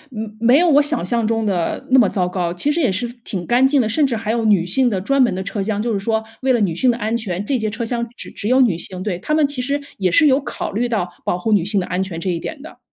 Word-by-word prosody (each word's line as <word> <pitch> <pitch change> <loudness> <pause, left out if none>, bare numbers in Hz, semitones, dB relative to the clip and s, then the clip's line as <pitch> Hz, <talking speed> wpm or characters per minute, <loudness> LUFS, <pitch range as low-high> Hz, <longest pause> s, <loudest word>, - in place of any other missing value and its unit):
嗯， 215 0 -6
没 240 +4 +5
有 350 +2 +4
我 290 -1 +6
想 295 - +1
象 230 +3 0
中 225 0 0
的 185 -5 -1
那 260 - +7
么 215 - +4
糟 180 -3 0
糕。 180 -2 -2
其 230 +12 0
实 315 - -1
也 260 -10 +2
是 215 +6 -2 0.2
挺 185 -6 -5
干 245 +2 +3
净 280 0 +2
的， 220 - 0
甚 290 +6 +2
至 245 - -2
还 220 -1 -2
有 230 -1 0
女 200 -5 +3
性 245 +8 +2
的 195 -5 -1
专 275 +8 +1
门 240 -6 +3
的 190 - -3
车 200 +1 -4
厢， 205 +1 -2
就 230 -1 -1
是 200 - -1
说 220 +2 -1 0.2
为 265 0 +2
了 245 - +3
女 195 -6 +1
性 250 +10 +1
的 235 - +1
安 220 0 -1
全， 205 -5 -3
这 270 +4 0
节 220 -1 -1
车 230 +2 -4
厢 235 0 -2
只 - - -8
只 205 - -5
有 255 +3 +4
女 225 -9 +3
性。 185 +1 -6
对， 185 -4 -3
他 305 - -3
们 305 -2 +3
其 280 -3 -4
实 280 +3 -1 0.2
也 190 -2 +1
是 310 - +5
有 270 -1 +4
考 - - -5
虑 240 +4 -1
到 210 -6 -1 0.2
保 175 - -1
护 220 +5 -2
女 205 -5 +3
性 200 +2 0
的 180 - -2
安 180 +2 -1
全 180 -4 -6
这 185 - -3
一 170 - -2
点 310 - -6
的。 315 - -12
220 Hz, 340 characters per minute, -19 LUFS, 190-255 Hz, 0.2 s, 那